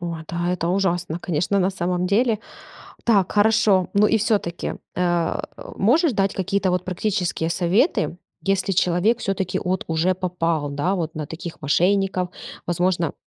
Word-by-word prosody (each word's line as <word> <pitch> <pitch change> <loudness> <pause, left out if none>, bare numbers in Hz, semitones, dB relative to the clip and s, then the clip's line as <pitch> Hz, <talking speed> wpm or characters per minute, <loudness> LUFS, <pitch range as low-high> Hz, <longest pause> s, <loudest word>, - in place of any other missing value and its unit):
О 170 -1 -4
да! 175 +1 -1
Это 170 -2 -2
ужасно, 175 -3 0
конечно, 175 +3 0
на 190 0 +2
самом 180 -1 -1
деле. 220 +3 +2 0.7
Так, 200 -6 +3
хорошо. 205 -3 +3
Ну 205 +1 +5
и 225 - +3
всё-таки. 200 -5 -1 0.2
А, 175 -2 0 0.3
можешь 280 - +3
дать 195 -1 +1
какие-то 195 0 0
вот 180 0 -1
практические 180 -3 -1
советы, 180 - +1 0.2
если 195 0 0
человек 185 +5 +2
всё-таки 190 -4 -1
вот 185 +1 -1
уже 165 +3 +1
попал, 170 -5 -1
да, 145 +7 0
вот 165 -4 -3
на 155 -1 -3
таких 165 +1 -8
мошенников, 185 +4 +1 0.4
возможно, 175 -2 0
180 Hz, 145 wpm, -22 LUFS, 170-200 Hz, 0.7 s, Ну